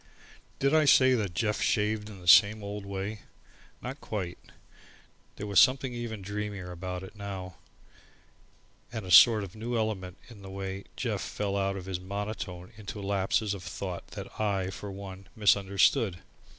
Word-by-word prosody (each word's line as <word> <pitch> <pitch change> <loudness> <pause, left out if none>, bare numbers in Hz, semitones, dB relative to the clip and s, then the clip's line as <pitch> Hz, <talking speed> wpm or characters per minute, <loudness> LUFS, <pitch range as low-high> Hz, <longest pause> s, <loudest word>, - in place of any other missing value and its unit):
Did 140 +2 +2
I 155 -1 +5
say 130 -2 +6
that 105 -7 -1
Jeff 105 +2 0
shaved 105 0 +1
in 100 -3 -10
the 90 - -12
same 105 +3 +7
old 100 0 -6
way? 100 +2 -4 0.6
Not 130 +4 -6
quite. 95 -5 -4 1.0
There 105 - -6
was 100 -2 +4
something 130 -1 +4
even 115 -4 -5
dreamier 100 -2 -4
about 90 +1 -5
it 95 - -11
now, 95 -3 -6 1.3
and 110 -4 -5
a 90 - -5
sort 110 -1 +8
of 95 0 -9
new 115 +2 -3
element 100 -4 -2
in 115 -5 -13
the 95 - -9
way 95 0 -5
Jeff - - -2
fell 100 -1 -3
out 100 0 0
of 90 - -7
his 95 -2 -3
monotone 100 -1 -5
into 105 0 -7
lapses 100 +1 0
of 100 - -6
thought 90 +1 -6
that - - -8
I, 95 -3 0
for 100 +2 -7
one, 95 -1 -9
misunderstood. 100 -2 +3
100 Hz, 165 wpm, -29 LUFS, 95-110 Hz, 1.3 s, sort